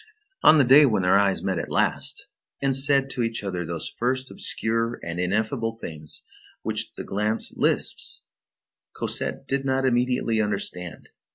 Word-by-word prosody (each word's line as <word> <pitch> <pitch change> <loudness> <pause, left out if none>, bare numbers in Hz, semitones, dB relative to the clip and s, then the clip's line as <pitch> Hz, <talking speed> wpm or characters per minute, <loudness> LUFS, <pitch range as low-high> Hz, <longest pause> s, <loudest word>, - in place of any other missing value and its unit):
On 155 - +7
the 145 - +6
day 140 +4 +7
when 105 -6 +1
their 90 +2 +5
eyes 100 -1 +1
met 95 -3 -1
at - - -5
last, - - -1 0.3
and 135 -1 +1
said 135 0 +3
to 125 - -3
each 115 -2 -1
other 90 -3 -3
those 85 -1 -4
first, 130 +2 -2
obscure, 115 +1 -1
and 85 +1 -4
ineffable 110 +5 -1
things 75 -5 -6 0.4
which - - -1
the - - -6
glance 105 +3 -1
lisps, - - 0 0.7
Cosette - - -3
did 135 0 -1
not 135 0 0
immediately 125 -3 +1
understand. 95 -5 -3
115 Hz, 155 wpm, -25 LUFS, 95-130 Hz, 0.7 s, On